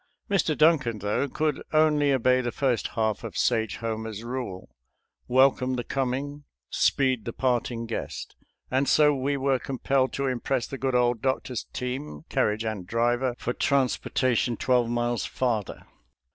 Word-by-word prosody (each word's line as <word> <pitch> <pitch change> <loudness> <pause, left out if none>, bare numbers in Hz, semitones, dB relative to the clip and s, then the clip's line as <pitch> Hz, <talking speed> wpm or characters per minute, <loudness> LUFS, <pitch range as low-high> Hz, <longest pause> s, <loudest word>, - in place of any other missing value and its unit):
Mr. 170 -6 +2
Duncan, 150 -8 +3
though, 105 +7 -1
could 155 +1 -1
only 150 -2 +3
obey 130 -1 +3
the 120 -1 -2
first 130 -1 0
half 110 -2 0
of - - -6
Sage 110 -2 +1
Homer's 110 -1 -4
rule, 120 -7 -5 0.6
"Welcome 130 0 +3
the 120 - -2
coming, 135 +3 -2 0.3
speed 130 -5 +2
the 115 - -3
parting 120 -2 -1
guest," 115 - -5 0.4
and 135 +2 +2
so 150 -1 +5
we 140 +1 -1
were 135 -1 +1
compelled 130 0 0
to 140 - -1
impress 130 0 -1
the 135 - -7
good 130 -1 0
old 120 -2 +2
doctor's 130 -2 -1
team, 125 - -5
carriage 105 +2 0
and 105 -5 -4
driver, 120 +3 +1
for 120 - -3
transportation 130 -3 +1
twelve 125 -2 +2
miles 120 0 -1
farther. 115 -6 -2
125 Hz, 145 wpm, -26 LUFS, 115-135 Hz, 0.6 s, so